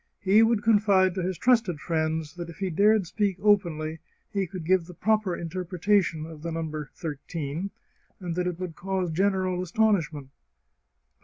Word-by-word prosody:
He 200 +3 +5
would 225 -2 +3
confide 200 -4 +4
to 185 - -2
his 180 0 -2
trusted 230 -10 +2
friends 160 -1 -1
that 175 -1 -7
if 170 - -11
he 190 -2 -2
dared 205 +3 +4
speak 200 +1 -1
openly 165 -7 +1 0.3
he 195 -2 0
could 175 -1 -7
give 180 -1 +2
the 180 - -11
proper 215 -4 +1
interpretation 180 0 0
of 160 -2 -10
the 170 +1 -4
number 155 -3 -4
thirteen, 160 +2 -4 0.5
and 175 -3 -4
that 180 +1 -1
it 180 -1 -3
would 180 -3 -5
cause 190 -2 -2
general 185 0 +1
astonishment 170 -7 0
(1813). - - -39
180 Hz, 165 wpm, -27 LUFS, 160-200 Hz, 0.5 s, He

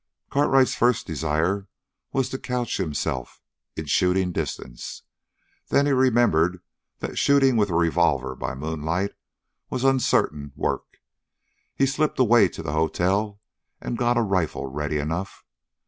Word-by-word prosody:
Cartwright's 135 -2 +3
first 120 -1 +2
desire 80 +6 -1 0.4
was 135 -2 0
to 130 - -5
couch 125 -2 -2
himself 75 -8 -3 0.4
in 80 - -5
shooting 90 +4 +2
distance. - - -5 0.6
Then 140 - +3
he 145 - +2
remembered 120 - +3 0.4
that - - -3
shooting 135 -2 +4
with 105 -3 +2
a 85 - -1
revolver 85 -3 +2
by 65 0 -4
moonlight 80 +7 -2 0.6
was 130 0 -3
uncertain 75 - +1
work. - - -3 0.8
He 135 - +3
slipped 145 +3 0
away 120 -4 +5
to 85 - -8
the 75 -2 -3
hotel 95 +6 0 0.4
and - - -4
got 120 0 +1
a 120 - +3
rifle 95 -9 -1
ready 75 +3 -3
enough. 80 +6 -4
95 Hz, 130 wpm, -24 LUFS, 80-125 Hz, 0.8 s, away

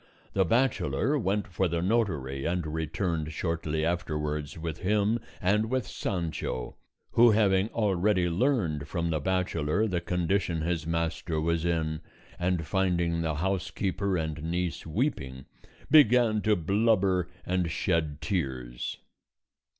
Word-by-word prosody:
The 95 -1 +3
bachelor 130 - +1
went 105 -1 0
for 95 0 0
the 85 0 -1
notary, 85 - 0
and 85 0 -1
returned 80 +1 -2
shortly 80 -1 -1
afterwards 75 -3 -2
with 80 -1 -5
him 105 +4 +1 0.2
and 105 +4 +2
with 130 -2 0
Sancho, 80 -9 -3 0.4
who, 120 +1 +6
having 100 -3 +3
already 100 -4 +1
learned 85 - 0
from 85 0 -1
the 80 - 0
bachelor 90 +1 0
the 90 -5 -1
condition 90 0 0
his 85 -2 -1
master 85 -1 -1
was 85 +1 0
in, 80 -2 0 0.4
and 90 -2 0
finding 85 -3 +1
the 80 -2 -1
housekeeper 95 +2 -1
and 80 -2 -3
niece 85 +1 -2
weeping, 75 - -2 0.5
began 120 -7 +6
to 105 +2 +3
blubber 95 -1 +2 0.2
and 90 -2 0
shed 75 +2 -1
tears. 65 -8 -3
85 Hz, 125 wpm, -28 LUFS, 80-100 Hz, 0.5 s, who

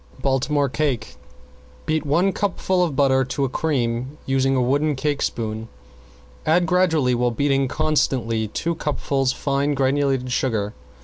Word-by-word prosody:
~BALTIMORE 140 +2 +1
CAKE~ 135 -5 -2 0.7
Beat 155 -1 -1
one 175 +7 +3
cupful 185 -2 0
of 160 -6 -1
butter 130 -1 +3
to 130 +2 -1
a - - -2
cream, 130 -2 -1
using 135 0 +1
a - - +2
wood 140 +3 +1
cake 145 +1 -1
spoon. 110 -1 -3 0.8
Add 175 +3 +3
gradually 160 -7 +2
while 120 0 +1
beating 135 +2 +1
constantly 120 -7 0
two 165 +10 -2
cupfuls 140 -4 -1
fine 140 +1 -1
granulated 135 -1 +1
sugar. 110 -5 -1
135 Hz, 135 wpm, -22 LUFS, 125-150 Hz, 0.8 s, one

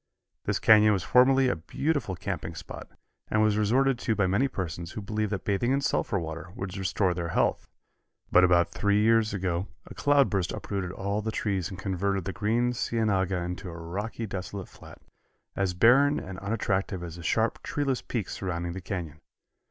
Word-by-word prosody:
This - - +1
canyon 105 -1 +6
was 95 -3 -1
formerly 130 +4 +5
a - - +1
beautiful 140 - -2
camping 85 -3 -5
spot, - - -8 0.4
and 110 - +1
was 105 -1 +3
resorted 125 +5 +2
to 115 - 0
by 100 -2 +2
many 100 +9 +2
persons 85 - -5
who - - -5
believed 105 0 -2
that 100 - -3
bathing 105 +5 +1
in 135 - +2
sulphur 120 -6 0
water 80 -1 -5
would 95 -6 -5
restore 95 0 0
their 85 -1 -3
health, 85 - 0 0.6
but 90 - +6
about 85 -1 +4
three 100 0 +1
years 115 0 +3
ago 95 -1 -2 0.2
a - - -10
cloudburst 135 -11 +2
uprooted 95 -3 -4
all 100 +2 -2
the 110 +1 -3
trees 95 -6 -1
and 95 - -8
converted 95 0 -1
the 95 - -3
green 120 +4 +1
cienaga 100 -6 0
into 90 +1 -5
a 85 - -8
rocky 100 +8 -4
desolate 95 -1 -6
flat, - - -14 0.6
as 95 -2 0
barren 135 +9 +5
and 95 0 -7
unattractive 100 -3 -1
as 85 -1 -7
the - - -9
sharp, 110 +7 0
treeless 140 -3 -1
peaks 110 -6 -4
surrounding 85 -2 -3
the 95 - -6
canyon. 85 -6 -5
100 Hz, 180 wpm, -28 LUFS, 90-110 Hz, 0.6 s, canyon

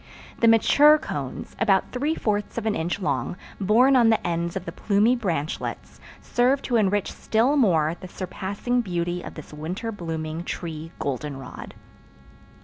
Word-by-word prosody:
The 230 - +4
mature 290 +7 +6
cones, 140 - -6
about 200 -4 +2
three 290 +5 -1
fourths 210 -6 -2
of - - -2
an 220 - +1
inch 170 +2 -2
long, 140 -2 -2 0.2
born 230 +7 +4
on 235 -3 +5
the 220 - +2
ends 170 0 -1
of 190 -1 -4
the - - -5
plumy 215 +4 +2
branchlets, 170 - -3 0.2
serve 260 +3 +2
to 245 - -1
enrich 205 -2 +1
still 235 +6 +1
more 170 - +3
the 185 - -8
surpassing 200 +7 -2
beauty 175 -3 -2
of - - -9
this 155 -1 -10
winter 180 +9 -4
blooming 165 -4 -4
tree 165 -2 -6
goldenrod. 135 -1 -5
190 Hz, 150 wpm, -24 LUFS, 165-230 Hz, 0.2 s, mature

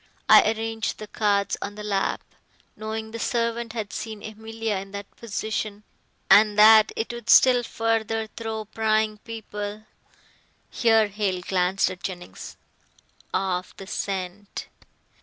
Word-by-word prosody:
I - - +7
arranged 225 0 -3
the 215 - -7
cards 205 -2 0
on 205 0 -5
the 210 - -7
lap, 200 -2 -1 0.5
knowing 220 +1 -5
the 230 - -6
servant 230 -1 -1
had 220 -3 -5
seen 215 -1 -6
Emilia 220 0 -4
in 195 +1 -7
that 200 0 -8
position, 215 -1 -4 0.4
and 210 0 +6
that 215 0 +8
it 225 +1 -3
would 235 -1 -8
still 250 0 +7
further 225 -1 -1
throw 220 0 -5
prying 215 0 0
people" 210 -2 -6 0.9
here 225 -2 +4
Hale 200 -3 -2
glanced 185 +1 +1
at 180 -1 -9
Jennings 175 -1 -7 0.7
"off 185 -1 -2
the 195 - -9
scent. 195 +1 -5
215 Hz, 130 wpm, -25 LUFS, 200-225 Hz, 0.9 s, that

